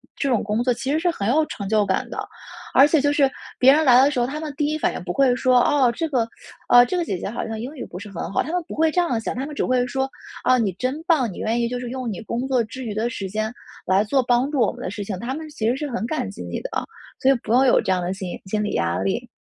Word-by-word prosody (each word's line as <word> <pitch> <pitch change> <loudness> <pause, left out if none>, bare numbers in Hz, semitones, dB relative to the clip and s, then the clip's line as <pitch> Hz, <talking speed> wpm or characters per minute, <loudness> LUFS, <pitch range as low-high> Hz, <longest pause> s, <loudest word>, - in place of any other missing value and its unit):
这 280 - -1
种 240 -4 +2
工 215 +3 -1
作 250 0 +2
其 260 +3 -5
实 295 - +2
是 345 +2 +1
很 200 -11 -3
有 305 +7 +3
成 200 - -6
就 210 0 +2
感 190 -1 -1
的。 - - -4 0.5
而 275 - +7
且 305 -1 +3
就 290 +1 +2
是 285 -2 +3 0.3
别 265 +2 +7
人 310 +2 +3
来 255 -3 +7
的 275 - +5
时 290 - -4
候， - - +2
他 280 +5 -4
们 310 -2 -5
第 295 - 0
一 305 +1 0
反 - - 0
应 - - -6
不 175 - -3
会 255 +4 +3
说， 255 0 +4
哦， 260 -1 +3
这 325 +8 -2
个， 255 -7 +1 0.4
啊， 245 0 +8
这 245 - -3
个 355 - +1
姐 195 - -3
姐 175 - -4
好 230 - -4
像 225 -1 -5
英 255 +7 -6
语 265 - -6
不 180 - -9
是 205 +1 -9
很 190 -1 -5
好， - - +1
他 285 - -5
们 355 -1 0
不 - - -5
会 320 +1 +3
这 355 +3 +2
样 255 -10 0
想， 225 - -4
他 260 +2 -3
们 300 - -7
只 - - -1
会 250 -1 +2
说， 265 +2 -2 0.4
哦， 255 - +5
你 220 -5 +1
真 265 +5 -2
棒， 295 - +2
你 - - -9
愿 225 +2 0
意 235 - +1
就 245 +1 -3
是 245 - -5
用 255 -1 -4
你 205 - -5
工 235 +3 -3
作 255 -3 +2
之 255 +4 -8
余 215 - -3
的 220 +3 -1
时 200 -5 -5
间， 215 +3 -2 0.3
来 190 +2 +3
做 265 +5 +2
帮 245 +2 +2
助 295 - -2
我 220 - +3
们 - - -11
的 - - -3
事 205 +2 -5
情。 195 -2 -5
他 240 +6 -3
们 315 0 -7
其 225 -7 -2
实 240 - +2
是 290 +2 -4
很 235 -2 -2
感 95 - -2
激 95 - -10
你 85 0 -5
的 - - -5
啊， - - -2 0.3
所 265 - +3
以 - - +7
不 - - -4
用 255 +3 +5
有 255 - +5
这 - - -1
样 185 -1 +1
的 175 +1 -2
心 190 -2 -6
心 210 +2 -1
理 210 - -2
压 85 +1 0
力。 95 0 -2
245 Hz, 345 characters per minute, -22 LUFS, 215-275 Hz, 0.5 s, 啊